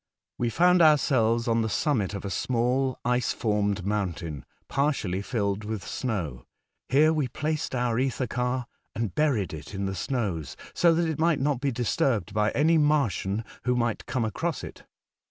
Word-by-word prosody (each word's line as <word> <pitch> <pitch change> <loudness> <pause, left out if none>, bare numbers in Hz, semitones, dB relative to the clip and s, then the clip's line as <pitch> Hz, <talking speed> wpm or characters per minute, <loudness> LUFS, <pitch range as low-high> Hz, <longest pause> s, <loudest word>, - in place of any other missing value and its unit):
We 120 - +1
found 180 +6 +4
ourselves 125 -7 +4
on 115 0 +2
tbe 110 - -1
summit 110 - 0
of 100 - -6
a 100 - -3
small 125 +4 0
ice 125 -1 +1
formed 105 -3 0
mountain, 85 -8 -3 0.2
partially 135 -10 0
filled 100 -3 -1
witb 105 -1 -5
snow. 90 - -4 0.4
Here 155 +4 +5
we 150 -4 0
placed 150 +2 -2
our 120 -2 0
etber 130 0 0
car 125 +2 -1 0.3
and 115 -5 -2
buried 135 - +1
it 80 +6 -8
in 100 0 -2
tbe 95 - -3
snows, 95 - -3 0.2
so 170 -2 +4
tbat 170 0 +1
it 160 - -2
migbt 165 -1 +3
not 140 -2 0
be 140 -1 +1
disturbed 115 -4 0
by 105 0 +2
any 160 +3 +4
Martian 115 -8 +1 0.2
wbo 125 0 +1
migbt 120 -2 -1
come 125 -3 0
across 165 +9 -2
it. - - -10
120 Hz, 170 wpm, -27 LUFS, 105-140 Hz, 0.4 s, Here